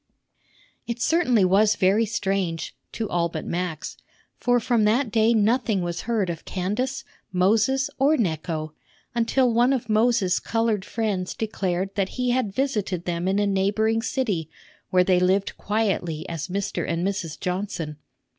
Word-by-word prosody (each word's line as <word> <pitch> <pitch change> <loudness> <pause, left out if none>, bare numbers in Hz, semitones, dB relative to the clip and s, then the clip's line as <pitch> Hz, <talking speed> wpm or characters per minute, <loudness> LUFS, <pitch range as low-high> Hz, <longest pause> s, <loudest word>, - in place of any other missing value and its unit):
It 235 0 -3
certainly 255 - +3
was 205 +3 +4
very 205 +4 +3
strange 190 -5 -2 0.2
(to 225 - -2
all 170 -2 0
but - - -5
Max), 175 -2 -3 0.4
for 245 0 +2
from 235 -1 +1
that 230 +3 +2
day 225 +1 +4
nothing 215 -2 +2
was 175 0 -3
heard 220 -5 +1
of 165 - -8
Candace, 220 +9 -2 0.3
Moses, 225 +9 +2
or 290 +4 +4
Necho, 160 - -2 0.4
until 240 +1 +2
one 240 +3 +4
of 245 -3 -3
Moses' 215 -4 +3
colored 225 -3 0
friends 205 -6 -2
declared 195 -3 -2
that 195 -2 0
he 250 -1 +1
had 245 -5 0
visited 210 -10 -1
them 175 0 -2
in 195 +1 +1
a 205 - +2
neighboring 205 +3 +1
city, 225 - -1 0.4
where 180 -1 +4
they 180 -1 +3
lived 190 +2 +1
quietly 190 -6 -1
as 165 -1 -4
Mr. 195 +2 -2
and 170 +1 -1
Mrs. 190 -6 -3
Johnson. 180 -5 -3
205 Hz, 150 wpm, -24 LUFS, 180-230 Hz, 0.4 s, was